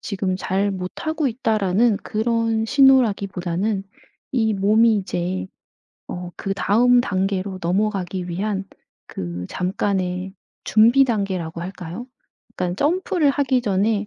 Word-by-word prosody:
지금 190 -2 -2
잘 195 +2 0
못하고 270 - -2
있다.'라는 220 -2 +1
그런 225 0 0
신호라기보다는 200 -7 +2 0.5
이 220 -4 +1
몸이 215 +3 +4
이제 185 -1 -3 0.6
어 180 0 -6
그 195 0 -3
다음 245 +5 +4
단계로 190 -3 -2
넘어가기 185 -1 -1
위한 195 +2 -2 0.4
그 90 0 -5
잠깐의 185 0 -2 0.3
준비 235 +5 +5
단계라고 190 -8 -2
할까요? 180 +5 -7 0.5
그러니깐 180 0 -2
점프를 320 - +1
하기 270 -2 +1
전에 205 0 0
200 Hz, 260 characters per minute, -22 LUFS, 185-230 Hz, 0.6 s, 준비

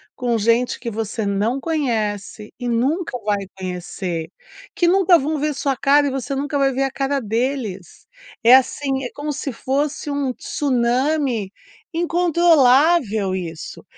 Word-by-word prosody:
com 240 -2 0
gente 230 +3 +1
que 235 - -4
você 220 0 -3
não 205 +6 0
conhece 220 - -2
e 245 -1 -3
nunca 265 +5 0
vai 205 -2 0
conhecer. 180 -2 -5 0.5
Que 350 -4 +2
nunca 365 -1 +5
vão 300 +1 -2
ver 300 +1 0
sua 275 0 -1
cara 285 +3 +3
e - - -1
você 270 +1 -3
nunca 285 +1 -2
vai 275 -1 +3
ver 270 +1 -1
a 270 - -1
cara 275 +1 -1
deles, 225 - -3 0.4
é 240 +3 +9
assim, 270 +1 +1
é 250 - -4
como 295 +1 -3
se 280 0 -4
fosse 285 +5 -2
um 285 -2 -1
tsunami 255 -3 0 0.4
incontrolável 325 - +3
isso. 165 -4 -7
265 Hz, 145 wpm, -20 LUFS, 220-290 Hz, 0.5 s, é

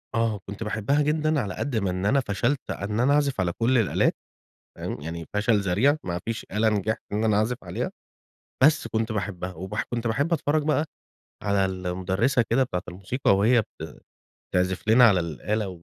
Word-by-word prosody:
آه، 115 -3 +1
كنت 100 +3 -5
باحبها 110 +7 0
جدًا 155 0 +1
على 100 -5 -4
قد 140 -4 -3
ما 100 -3 0
إن 90 +2 -2
أنا 140 +6 +4
فشلت 120 +4 -1
إن 105 +3 -3
أنا 135 +4 +4
أعزف 140 -6 +1
على 90 -2 0
كل 120 +6 +1
الآلات 110 - +2 0.6
تمام، - - -5
يعني 85 +1 -6
فشل 105 +1 +2
ذريع 105 +10 +2
ما 85 -1 -3
فيش 115 -1 -4
آلة 110 +2 +2
نجحت 110 +1 -1
إن 105 +2 0
أنا 105 -2 +3
أعزف 115 +3 +1
عليها، - - -3 0.7
بس 155 +2 +4
كنت 110 0 -1
باحبها، 95 -3 -3
وبح 95 +5 -4
كنت 120 0 -1
باحب 140 +9 +1
أتفرج 150 0 +1
بقى 150 +1 +1 0.6
على 100 -1 +2
المُدرِّسة 95 +7 0
كده 130 +3 +3
بتاعة 90 -7 -3
الموسيقى 100 +5 0
وهي 115 +3 +4
بت 80 -6 -11 0.5
تعزف 90 +3 0
لنا 120 +3 +7
على 95 -4 +3
الآلة 95 - -2
110 Hz, 180 wpm, -25 LUFS, 95-125 Hz, 0.7 s, لنا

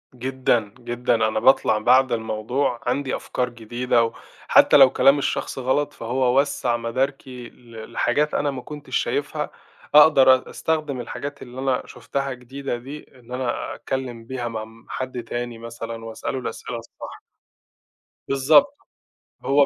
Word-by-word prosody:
جدًا، 125 -4 0
جدًا 120 0 0
أنا 110 -1 +1
باطلَع 110 -3 +4
بَعد 130 +4 +4
الموضوع 115 +3 -1
عندي 130 +2 -1
أفكار 125 -1 -2
جديدة 120 +1 0
وحتى 115 - +3
لو 135 -2 +9
كلام 135 +2 +4
الشخص 135 - -2
غلط، 145 +3 0
فهو 125 +2 +1
وسّع 130 -4 0
مداركي 125 +1 -3
ل 115 -2 -12
لحاجات 150 +5 +1
أنا 145 - 0
ما 130 -2 -6
كنتش 150 +1 -7
شايفها، - - -2 0.5
أقدر 140 -4 +8
أ 130 - -7
أستخدم 155 -5 -2
الحاجات 140 +4 -6
اللي 125 +1 -9
أنا 130 -1 0
شُفتها 140 -1 -4
جديدة 130 +1 -5
دي، 135 +5 -8 0.2
اللي 125 +1 -8
أنا 130 -1 -3
أتكلّم 125 -4 -5
بيها 120 -1 -4
مع 110 -2 -4
م 115 +1 -18
حَد 130 -2 -4
تاني 120 0 -5
مثلًا 115 0 -7
وأسأله 115 +4 -4
الأسئلة 120 0 -5
الصح. 115 0 -10 1.1
بالضبط 155 - +4 0.7
،هو 140 +1 +5
125 Hz, 140 wpm, -23 LUFS, 115-135 Hz, 1.1 s, لو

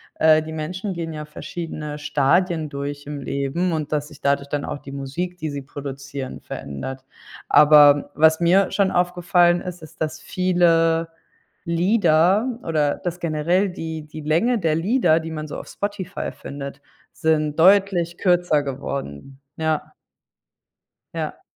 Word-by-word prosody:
äh, 155 0 +5
die 155 - -7
Menschen 180 +6 -4
gehen 165 -2 -5
ja 150 0 -6
verschiedene 150 -1 -6
Stadien 155 +3 +1
durch 140 0 -5
im 145 0 -6
Leben 140 +7 -1
und, 155 -3 -3
dass 150 -1 -1
sich - - -14
dadurch 140 0 0
dann 145 0 -2
auch - - -5
die 135 - -11
Musik, 140 +7 -4
die 160 -3 -4
sie 145 -1 -5
produzieren, 140 -1 -7
verändert. 130 - -7 0.4
Aber 145 -1 +6
was 160 +1 +5
mir 180 +3 +3
schon 195 -1 +2
aufgefallen 175 0 +2
ist, 180 -2 -7
ist, 155 - -14
dass 155 0 -2
viele 165 -3 +2 0.6
Lieder 185 +5 +2
oder 150 -3 +1
dass 175 0 -5
generell 170 +4 +1
die 160 -3 -6
die 155 +1 -9
Länge 170 +12 +2
der 165 -4 +1
Lieder, 170 -2 +2
die 165 0 -6
man 155 -1 -5
so 150 - -6
auf - - -10
Spotify 200 -2 -4
findet, 140 0 -8 0.3
sind 155 -2 0
deutlich 180 -2 +4
kürzer 175 -5 +2
geworden. 135 - -6 0.2
Ja. 160 -1 -1 1.2
Ja. - - -4
160 Hz, 145 wpm, -22 LUFS, 145-175 Hz, 1.2 s, Aber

